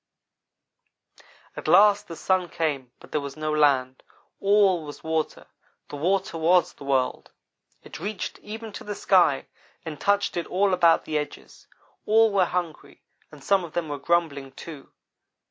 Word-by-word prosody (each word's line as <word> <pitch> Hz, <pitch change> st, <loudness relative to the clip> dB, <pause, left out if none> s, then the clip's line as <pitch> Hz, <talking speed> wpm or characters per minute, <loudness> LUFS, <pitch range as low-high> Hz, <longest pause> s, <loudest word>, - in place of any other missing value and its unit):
"At -, -, -7 dB
last 205 Hz, +4 st, +5 dB
the 165 Hz, -, -7 dB
sun 185 Hz, 0 st, 0 dB
came 140 Hz, -7 st, -2 dB
but -, -, -16 dB
there 150 Hz, -, 0 dB
was 140 Hz, +1 st, -7 dB
no 155 Hz, 0 st, -2 dB
land. 135 Hz, -4 st, +2 dB, 0.4 s
All 195 Hz, -4 st, +3 dB
was 145 Hz, -1 st, -10 dB
water. 160 Hz, -1 st, -2 dB, 0.4 s
The -, -, -7 dB
water 180 Hz, +2 st, -1 dB
was 175 Hz, +2 st, +3 dB
the -, -, -13 dB
world. 135 Hz, -2 st, 0 dB, 0.5 s
It -, -, -10 dB
reached 210 Hz, -1 st, -5 dB
even 220 Hz, +1 st, -8 dB
to -, -, -8 dB
the 205 Hz, 0 st, -5 dB
sky -, -, +3 dB, 0.4 s
and 155 Hz, -3 st, -7 dB
touched 200 Hz, 0 st, +1 dB
it 170 Hz, -, -2 dB
all 195 Hz, +1 st, +1 dB
about 170 Hz, -2 st, +4 dB
the 155 Hz, -1 st, -1 dB
edges. 150 Hz, -, -9 dB, 0.4 s
All 225 Hz, +1 st, +5 dB
were 190 Hz, -2 st, +4 dB
hungry, 175 Hz, -3 st, -5 dB, 0.3 s
and 150 Hz, -3 st, -14 dB
some 195 Hz, +2 st, +2 dB
of 170 Hz, -, -9 dB
them 170 Hz, -3 st, -2 dB
were 145 Hz, -1 st, -4 dB
grumbling, 140 Hz, -4 st, -1 dB
too. 150 Hz, -3 st, -11 dB
165 Hz, 160 wpm, -25 LUFS, 150-195 Hz, 0.5 s, last